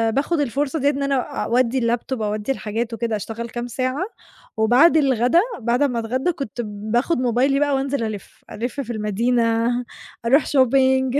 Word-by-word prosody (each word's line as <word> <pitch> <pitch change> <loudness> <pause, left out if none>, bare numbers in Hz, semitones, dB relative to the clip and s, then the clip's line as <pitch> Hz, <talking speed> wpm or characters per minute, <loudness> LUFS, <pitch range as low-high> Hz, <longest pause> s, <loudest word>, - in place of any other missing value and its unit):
باخُد 295 +4 0
الفرصة 285 +3 -1
دِيّة 280 +1 +3
إن 280 -1 -2
أنا 275 0 +1 0.3
أودّي 245 +1 +1
اللاب 235 0 -1
توب، 260 -4 -3
أودّي 210 +3 -2
الحاجات 230 -1 -3
وكده، 230 -1 -2
أشتغل 225 +3 -5
كام 240 +1 -5
ساعة 255 +6 -2 0.5
وبعد 250 +10 +5
الغدا 265 +2 +3 0.2
بعد 240 +2 0
أمّا 245 -5 0
أتغدى 255 +9 -1
كنت 270 -7 -5
باخُد 215 +9 -1
موبايلي 255 +3 +2
بقى 290 -1 +2
وأنزل 270 -2 -1
ألِف، 215 -3 -7
ألِف 245 +6 -4
في 245 -3 -5
المدينة، 230 +2 +1 0.6
أروح 270 +6 +4
shopping. 265 0 +3
245 Hz, 160 wpm, -21 LUFS, 230-275 Hz, 0.6 s, وبعد